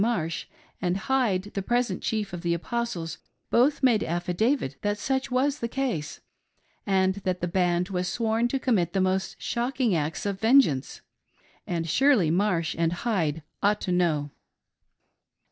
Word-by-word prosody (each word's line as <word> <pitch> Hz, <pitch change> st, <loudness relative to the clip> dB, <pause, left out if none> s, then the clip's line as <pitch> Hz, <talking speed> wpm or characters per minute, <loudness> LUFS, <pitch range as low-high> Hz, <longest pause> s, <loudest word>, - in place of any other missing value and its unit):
Marsh 170 Hz, -9 st, -1 dB, 0.3 s
and 180 Hz, 0 st, 0 dB
Hyde 210 Hz, -4 st, 0 dB
the 195 Hz, -, -2 dB
present 240 Hz, +4 st, 0 dB
chief 210 Hz, -4 st, -2 dB
of 175 Hz, -, -5 dB
the 170 Hz, -1 st, 0 dB
Apostles 175 Hz, -4 st, -3 dB, 0.3 s
both 270 Hz, +4 st, +3 dB
made 235 Hz, -5 st, +4 dB
affidavit 180 Hz, -, 0 dB
that 205 Hz, 0 st, 0 dB
such 265 Hz, +4 st, -1 dB
was 270 Hz, +3 st, +1 dB
the 235 Hz, -, -2 dB
case, 230 Hz, -, -3 dB, 0.7 s
and 190 Hz, -1 st, +3 dB
that 185 Hz, -1 st, -1 dB
the 175 Hz, -, -1 dB
band 180 Hz, 0 st, +1 dB
was 180 Hz, -1 st, -1 dB
sworn 225 Hz, +4 st, +1 dB
to 270 Hz, -, -1 dB
commit 195 Hz, -11 st, +1 dB
the 195 Hz, -, +1 dB
most 190 Hz, 0 st, 0 dB
shocking 245 Hz, -2 st, 0 dB
acts 155 Hz, +1 st, -2 dB
of 200 Hz, -1 st, -2 dB
vengeance, 225 Hz, -, +3 dB, 0.3 s
— -, -, -34 dB
and 165 Hz, -2 st, -2 dB
surely 230 Hz, -, +4 dB
Marsh 175 Hz, -3 st, +1 dB
and 165 Hz, -1 st, +2 dB
Hyde 170 Hz, -7 st, -1 dB, 0.2 s
ought 210 Hz, +1 st, +2 dB
to 185 Hz, -, -2 dB
know. 160 Hz, -5 st, +1 dB
195 Hz, 155 wpm, -26 LUFS, 175-235 Hz, 0.7 s, made